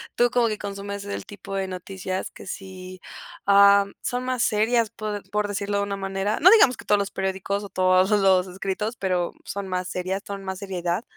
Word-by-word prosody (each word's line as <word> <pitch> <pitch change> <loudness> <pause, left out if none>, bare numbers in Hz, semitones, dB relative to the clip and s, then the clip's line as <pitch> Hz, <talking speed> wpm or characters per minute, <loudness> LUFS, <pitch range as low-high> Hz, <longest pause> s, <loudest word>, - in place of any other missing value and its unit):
Tú 240 0 +3
como 245 -1 +3
que 215 -1 -2
consumes 200 0 -6
el 200 - -5
tipo 205 -1 -9
de 195 -1 -1
noticias 185 0 -5
que - - -12
sí, 185 -2 -8 0.5
am, 200 0 +6
son 245 0 -2
más 255 -1 -1
serias, 220 +2 +2
por 215 -2 -5
por 210 0 0
decirlo 205 0 -2
de 200 - +1
una 200 0 -3
manera, 195 +1 -2
no 355 - +8
digamos 385 - +6
que - - -12
todos 210 - +4
los 200 0 -2
periódicos 190 +1 -2
o 200 - -8
todos 185 0 +3
los 195 -3 +4
escritos, 195 +4 -3
pero 180 -3 -1
son 200 -1 -5
más 185 -1 -2
serias, 185 +2 -3
son 200 -1 -6
más 190 -1 -4
seriedad. 185 0 -2
200 Hz, 200 wpm, -24 LUFS, 190-210 Hz, 0.5 s, no